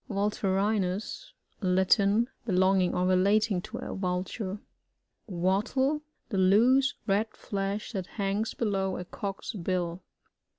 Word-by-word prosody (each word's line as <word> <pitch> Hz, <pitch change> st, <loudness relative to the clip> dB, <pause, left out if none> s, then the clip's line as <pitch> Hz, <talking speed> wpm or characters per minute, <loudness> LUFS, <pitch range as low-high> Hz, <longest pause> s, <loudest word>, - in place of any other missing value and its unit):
VuLTDRiNUs.— 200 Hz, -, -1 dB, 0.3 s
Latin. 200 Hz, +4 st, +3 dB, 0.2 s
Belonging 185 Hz, -1 st, +3 dB
or 180 Hz, -, +1 dB
relating 195 Hz, +2 st, +3 dB
to -, -, -7 dB
a -, -, -5 dB
Vulture. 185 Hz, +2 st, -3 dB, 0.7 s
Wattle 215 Hz, -, +1 dB
— -, -, -47 dB
The 200 Hz, -5 st, -1 dB
loose, 245 Hz, +9 st, +4 dB
red 210 Hz, +3 st, +1 dB
flesh 200 Hz, +1 st, -3 dB
that 190 Hz, -5 st, -4 dB
hangs 200 Hz, +2 st, -1 dB
below 195 Hz, -4 st, -1 dB
a 180 Hz, -, -5 dB
Cock*s 195 Hz, +5 st, -5 dB
bill. 180 Hz, -2 st, -2 dB
195 Hz, 115 wpm, -29 LUFS, 185-215 Hz, 0.7 s, loose